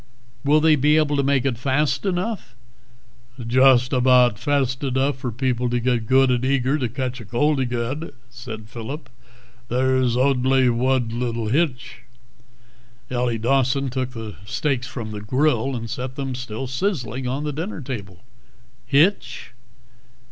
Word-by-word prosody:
"Will 145 Hz, +2 st, +4 dB
they 155 Hz, 0 st, +5 dB
be 150 Hz, +2 st, +3 dB
able 150 Hz, -2 st, +2 dB
to 140 Hz, -, +2 dB
make 140 Hz, -1 st, +1 dB
it 125 Hz, -4 st, -1 dB
fast 140 Hz, +8 st, 0 dB
enough?" 185 Hz, -, -3 dB, 0.8 s
"Just 125 Hz, +2 st, +4 dB
aboudt 125 Hz, -3 st, +4 dB
fast 135 Hz, -3 st, 0 dB
edough 135 Hz, +1 st, 0 dB
for 130 Hz, -2 st, -4 dB
people 125 Hz, 0 st, -1 dB
to 120 Hz, 0 st, 0 dB
get 120 Hz, -2 st, 0 dB
good 130 Hz, +1 st, +4 dB
ad 125 Hz, 0 st, 0 dB
eager 135 Hz, +2 st, +1 dB
to 125 Hz, -4 st, -1 dB
catch 130 Hz, 0 st, -4 dB
cold 145 Hz, +5 st, +1 dB
agaid," 125 Hz, +5 st, -3 dB, 0.2 s
said 120 Hz, -3 st, -9 dB
Phillip. 120 Hz, +4 st, -7 dB, 0.6 s
"There's 130 Hz, 0 st, +1 dB
odly 130 Hz, -1 st, +3 dB
wud 125 Hz, -1 st, +1 dB
little 115 Hz, -2 st, -2 dB
hitch...." 135 Hz, -1 st, -1 dB, 1.1 s
Ellie 120 Hz, -2 st, 0 dB
Dawson 135 Hz, +3 st, +1 dB
took 130 Hz, 0 st, -3 dB
the 110 Hz, -3 st, -7 dB
steaks 125 Hz, +3 st, -2 dB
from 120 Hz, -4 st, -6 dB
the 105 Hz, -1 st, -6 dB
grill 130 Hz, +2 st, +1 dB
and 115 Hz, -1 st, -5 dB
set 125 Hz, +3 st, -5 dB
them, 135 Hz, -2 st, -3 dB
still 125 Hz, 0 st, -5 dB
sizzling, 130 Hz, -, -2 dB
on 135 Hz, +4 st, -2 dB
the 150 Hz, -1 st, -3 dB
dinner 165 Hz, +6 st, -4 dB
table. 105 Hz, -9 st, -7 dB, 0.6 s
"Hitch?" 155 Hz, +5 st, +1 dB
130 Hz, 145 wpm, -22 LUFS, 120-140 Hz, 1.1 s, they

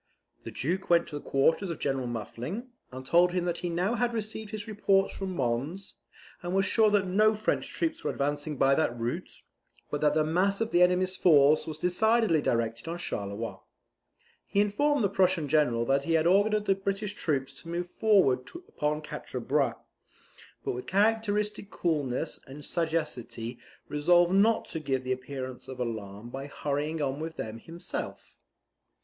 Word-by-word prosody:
The -, -, -4 dB
Duke 180 Hz, +8 st, -2 dB
went 170 Hz, -1 st, +4 dB
to 145 Hz, -, -5 dB
the -, -, -16 dB
quarters 160 Hz, +8 st, +2 dB
of 165 Hz, -, -3 dB
General 135 Hz, -2 st, -1 dB
Muffling, 125 Hz, -, -5 dB, 0.2 s
and 130 Hz, +1 st, -8 dB
told 175 Hz, +4 st, +4 dB
him 180 Hz, -1 st, 0 dB
that 175 Hz, -1 st, -1 dB
he 175 Hz, -, -3 dB
now 180 Hz, +6 st, 0 dB
had 240 Hz, 0 st, 0 dB
received 220 Hz, -1 st, -4 dB
his 210 Hz, 0 st, -5 dB
reports 195 Hz, -2 st, +2 dB
from 190 Hz, -2 st, -4 dB
Mons, 140 Hz, +9 st, -2 dB, 0.5 s
and 175 Hz, +1 st, -3 dB
was 195 Hz, 0 st, +3 dB
sure 220 Hz, 0 st, +4 dB
that 205 Hz, -2 st, +2 dB
no 215 Hz, +4 st, +3 dB
French 215 Hz, +1 st, -1 dB
troops 330 Hz, 0 st, -2 dB
were -, -, 0 dB
advancing 145 Hz, +1 st, -2 dB
by 135 Hz, +1 st, +4 dB
that 135 Hz, -5 st, +1 dB
route, 115 Hz, +1 st, -4 dB, 0.5 s
but 145 Hz, -, -2 dB
that 150 Hz, 0 st, +3 dB
the 155 Hz, -, +3 dB
mass 185 Hz, +6 st, +1 dB
of 225 Hz, 0 st, -1 dB
the 175 Hz, -, +4 dB
enemy's 180 Hz, +1 st, +3 dB
force 150 Hz, -4 st, +5 dB
was 155 Hz, -1 st, -5 dB
decidedly 185 Hz, 0 st, +3 dB
directed 115 Hz, 0 st, -1 dB
on 170 Hz, +1 st, -3 dB
Charleroi. 105 Hz, -, -4 dB, 0.9 s
He 200 Hz, -, 0 dB
informed 235 Hz, +7 st, +2 dB
the -, -, +4 dB
Prussian 185 Hz, -5 st, +2 dB
general 130 Hz, -6 st, +2 dB
that 140 Hz, +2 st, +1 dB
he 165 Hz, -, 0 dB
had 160 Hz, 0 st, +3 dB
ordered 205 Hz, +4 st, +3 dB
the 195 Hz, -, +4 dB
British 195 Hz, +1 st, -3 dB
troops 135 Hz, -8 st, -1 dB
to 165 Hz, -, -11 dB
move 175 Hz, +1 st, -2 dB
forward 180 Hz, -11 st, +3 dB, 0.2 s
upon 150 Hz, +1 st, -2 dB
Quatre 130 Hz, -3 st, -6 dB
Bras; 135 Hz, -1 st, +1 dB, 0.9 s
but -, -, 0 dB
with 125 Hz, +1 st, -6 dB
characteristic 210 Hz, 0 st, +1 dB
coolness 150 Hz, -5 st, -1 dB
and 140 Hz, +2 st, -9 dB
sagacity 125 Hz, -8 st, -2 dB, 0.3 s
resolved 175 Hz, +4 st, +3 dB
not 220 Hz, +3 st, +4 dB
to 160 Hz, -, -4 dB
give 135 Hz, -4 st, -1 dB
the 130 Hz, -, -3 dB
appearance 130 Hz, 0 st, -6 dB
of 130 Hz, -1 st, -8 dB
alarm 110 Hz, -2 st, -5 dB
by 135 Hz, +2 st, -6 dB
hurrying 150 Hz, +2 st, -2 dB
on 135 Hz, +1 st, -2 dB
with 160 Hz, +1 st, -5 dB
them 110 Hz, +1 st, -5 dB
himself. 165 Hz, +7 st, -7 dB
165 Hz, 175 wpm, -29 LUFS, 135-195 Hz, 0.9 s, force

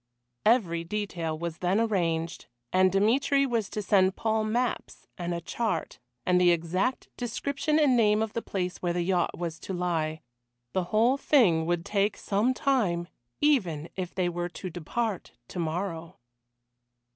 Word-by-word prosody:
Every 180 Hz, -8 st, +3 dB
detail 170 Hz, -4 st, -3 dB
was 170 Hz, 0 st, -5 dB
then 185 Hz, +3 st, +1 dB
arranged, 170 Hz, -7 st, -1 dB, 0.3 s
and 185 Hz, 0 st, +5 dB
Dmitry 250 Hz, +8 st, +3 dB
was 230 Hz, -6 st, -1 dB
to 210 Hz, -, -4 dB
send 190 Hz, -1 st, +3 dB
Paul 220 Hz, -1 st, 0 dB
maps, 240 Hz, +3 st, -2 dB
and 175 Hz, 0 st, -4 dB
a 170 Hz, -, -1 dB
chart, 195 Hz, -2 st, -2 dB, 0.3 s
and 180 Hz, 0 st, +3 dB
the 180 Hz, -, +6 dB
exact 175 Hz, +8 st, 0 dB
description 280 Hz, +5 st, -1 dB
and 290 Hz, -5 st, +4 dB
name 215 Hz, -2 st, +4 dB
of 220 Hz, -, -4 dB
the 230 Hz, -, -2 dB
place 180 Hz, -4 st, -3 dB
where 175 Hz, -1 st, -1 dB
the 175 Hz, 0 st, 0 dB
yacht 180 Hz, -1 st, 0 dB
was 170 Hz, -2 st, -4 dB
to 190 Hz, -, -6 dB
lie. 160 Hz, -3 st, -1 dB, 0.5 s
The 185 Hz, -2 st, 0 dB
whole 230 Hz, +8 st, +3 dB
thing 185 Hz, -, +3 dB
would 175 Hz, -1 st, 0 dB
take 205 Hz, 0 st, +1 dB
some 210 Hz, +5 st, +1 dB
time, 195 Hz, -13 st, +1 dB, 0.3 s
even 180 Hz, -, +2 dB
if 185 Hz, -2 st, -5 dB
they 180 Hz, -1 st, +1 dB
were 175 Hz, 0 st, -2 dB
to 185 Hz, +1 st, -7 dB
depart 195 Hz, +5 st, -3 dB, 0.2 s
to -, -, -6 dB
morrow. 170 Hz, 0 st, -3 dB
185 Hz, 155 wpm, -28 LUFS, 170-220 Hz, 0.5 s, the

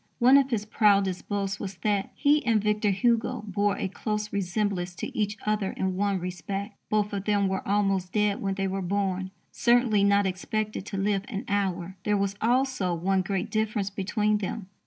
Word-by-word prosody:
One 255 Hz, +2 st, +6 dB
of 275 Hz, -1 st, +3 dB
his 215 Hz, -4 st, -1 dB
proudest 200 Hz, -4 st, +2 dB
boasts 195 Hz, -1 st, -2 dB
was 195 Hz, -1 st, -5 dB
that 205 Hz, -2 st, +1 dB
he 295 Hz, 0 st, +3 dB
and 225 Hz, -3 st, +3 dB
Victor 210 Hz, 0 st, +1 dB
Hugo 230 Hz, +3 st, +1 dB
bore 205 Hz, 0 st, 0 dB
a -, -, -1 dB
close 210 Hz, +2 st, -3 dB
resemblance 190 Hz, -2 st, -1 dB
to -, -, -6 dB
each 210 Hz, 0 st, -1 dB
other 210 Hz, -2 st, 0 dB
in 190 Hz, -1 st, -2 dB
one 200 Hz, 0 st, +1 dB
respect: 180 Hz, +3 st, -4 dB, 0.2 s
both 210 Hz, -1 st, +1 dB
of 200 Hz, -1 st, -3 dB
them 205 Hz, -2 st, +2 dB
were 190 Hz, 0 st, -3 dB
almost 195 Hz, -2 st, +1 dB
dead 210 Hz, -1 st, +1 dB
when 195 Hz, -1 st, -1 dB
they 195 Hz, 0 st, -1 dB
were 195 Hz, +1 st, -2 dB
born, 190 Hz, 0 st, -1 dB, 0.2 s
"certainly 235 Hz, -4 st, +3 dB
not 200 Hz, 0 st, +4 dB
expected 210 Hz, +2 st, -3 dB
to 195 Hz, -, -4 dB
live 195 Hz, 0 st, +1 dB
an 200 Hz, -3 st, -5 dB
hour." 190 Hz, -2 st, -1 dB
There 210 Hz, -1 st, +2 dB
was 200 Hz, 0 st, 0 dB
also 245 Hz, -6 st, +1 dB
one 190 Hz, +3 st, +1 dB
great 185 Hz, 0 st, -2 dB
difference 215 Hz, -2 st, -1 dB
between 210 Hz, +2 st, 0 dB
them. 195 Hz, 0 st, -5 dB
200 Hz, 185 wpm, -27 LUFS, 190-210 Hz, 0.2 s, One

